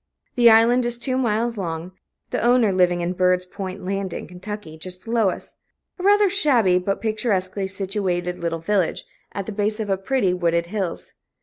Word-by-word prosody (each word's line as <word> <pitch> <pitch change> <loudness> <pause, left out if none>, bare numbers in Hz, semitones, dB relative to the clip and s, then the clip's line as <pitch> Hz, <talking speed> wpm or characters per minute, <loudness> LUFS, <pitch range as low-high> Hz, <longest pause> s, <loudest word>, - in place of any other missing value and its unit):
The 240 -1 +6
island 230 +3 +5
is 240 0 +2
two 255 +2 -1
miles 235 -2 0
long, 165 -1 -4 0.4
the - - -1
owner 240 -3 +4
living 180 -1 +2
in 175 +1 -1
Bird's 180 0 +2
Point 185 0 -7
Landing, 195 -1 -3 0.2
Ky., 210 -6 -6
just 180 +3 -6
below 225 -3 +2
us - - -7 0.5
a - - -6
rather 410 +1 +5
shabby 250 - +3
but 195 +2 -2
picturesquely 200 -4 -1
situated 190 -2 -2
little 170 -1 -2
village, 185 +1 -1 0.3
at 200 - -4
the 220 - -5
base 210 +1 -1
of 195 -3 -2
pretty, 230 -7 +1
wooded 170 -1 0
hills. 185 -1 -4
195 Hz, 170 wpm, -22 LUFS, 180-230 Hz, 0.5 s, The